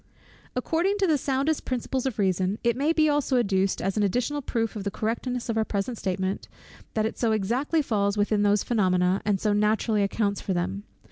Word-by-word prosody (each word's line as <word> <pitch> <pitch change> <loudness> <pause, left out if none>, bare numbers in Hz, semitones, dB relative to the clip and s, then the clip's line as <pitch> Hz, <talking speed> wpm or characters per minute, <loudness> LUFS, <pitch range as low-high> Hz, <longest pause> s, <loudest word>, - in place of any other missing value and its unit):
According 335 +10 0
to 395 - +2
the 320 -4 +3
soundest 275 +4 0
principles 255 +1 -2
of 255 - -3
reasoning, 190 0 +1
it 235 -1 +2
may 285 +5 +1
be 315 -2 +3
also 290 -3 +1
adduced 195 -4 +1
as 195 +2 -1
an - - +2
additional 245 +8 0
proof 230 -4 -2
of 205 - -4
the 200 - -1
correctness 235 +4 -3
of 225 -2 0
our - - +3
present 215 +3 -2
statement, 190 -1 -2 0.5
that 215 -1 +1
it 220 - -4
so 230 -2 +2
exactly 250 - 0
falls 200 -5 0
in - - -1
with 205 - +1
those 205 -1 +2
phænomena, 185 -4 +2
and 205 -2 +1
so 210 +1 +1
naturally 210 +1 +2
accounts 200 0 0
for 190 - -2
them. 190 +4 -2
220 Hz, 205 wpm, -26 LUFS, 200-255 Hz, 0.5 s, the